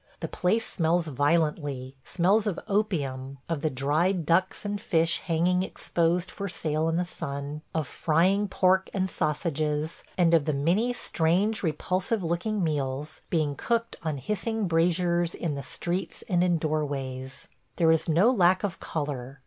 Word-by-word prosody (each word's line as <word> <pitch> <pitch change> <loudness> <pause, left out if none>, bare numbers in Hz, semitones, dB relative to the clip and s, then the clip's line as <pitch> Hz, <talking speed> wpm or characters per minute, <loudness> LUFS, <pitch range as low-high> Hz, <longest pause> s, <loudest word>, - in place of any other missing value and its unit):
The - - -3
place 215 +6 0
smells 165 -1 0
violently; 145 -2 0
smells 200 +5 +2
of 195 - -1
opium, 140 - -1
of 165 -4 -2
the 155 - +1
dried 155 +7 +1
ducks 185 +5 +1
and 205 0 -2
fish 165 -4 +2
hanging 175 +2 +1
exposed 175 -1 0
for 200 0 -5
sale 155 -2 0
in 165 - 0
the 180 +1 +1
sun, 145 -3 -5
of 160 -2 0
frying 185 +6 +2
pork 190 0 +2
and 190 -2 0
sausages, 155 0 -1
and 170 -2 +4
of 160 -4 +4
the 155 - 0
many 180 - +2
strange 200 -1 +1
repulsive 185 +5 -1
looking 180 +5 -1
meals 145 -1 -2
being 155 -4 +1
cooked 230 +8 -1
on 155 -3 -2
hissing 210 - -2
braziers 170 0 +1
in 165 -4 -2
the 140 - -4
streets 170 +5 -4
and 180 -1 +2
in 175 -2 +3
doorways. 140 -4 -3 0.3
There 165 -2 +4
is 160 +1 +1
no 180 +10 +5
lack 185 -5 +3
of 200 -4 -2
color. 140 -3 -4
165 Hz, 155 wpm, -27 LUFS, 150-185 Hz, 0.3 s, no